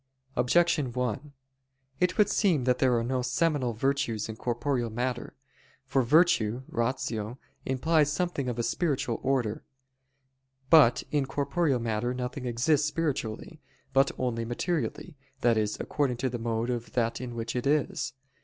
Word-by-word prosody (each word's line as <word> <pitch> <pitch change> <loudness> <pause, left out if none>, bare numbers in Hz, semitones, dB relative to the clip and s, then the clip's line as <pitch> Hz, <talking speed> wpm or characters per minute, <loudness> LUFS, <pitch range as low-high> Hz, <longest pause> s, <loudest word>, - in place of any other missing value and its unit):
Objection 150 +2 +2
1: 125 +3 -3 0.7
It 180 0 +1
would 210 -2 +5
seem 185 - +2
that 125 0 +2
there 125 -2 +3
are 115 - 0
no 125 +2 -1
seminal 130 0 0
virtues 120 -3 -1
in 110 - -6
corporeal 120 +1 -1
matter. 120 +2 -3 0.5
For 135 0 +2
virtue 130 -4 +3
(ratio) 115 -2 -2 0.3
implies 150 +3 +2
something 150 -4 -1
of 120 - -4
a 120 - 0
spiritual 135 -6 -1
order. 130 -5 0 1.1
But 150 -8 +7
in 145 -3 +1
corporeal 140 +1 0
matter 115 +2 -1
nothing 125 +1 -4
exists 135 +5 +2
spiritually, 150 -2 -3 0.3
but 135 +1 +4
only 120 -2 -1
materially, 155 +5 -3 0.2
that 120 -1 +4
is, 105 -1 0
according 135 -5 -1
to 130 0 -1
the 120 - -4
mode 115 +1 -1
of 120 -1 -4
that 115 -1 0
in 120 -2 -6
which 115 0 -4
it 125 +2 -1
is. 150 -3 0
125 Hz, 145 wpm, -28 LUFS, 120-145 Hz, 1.1 s, But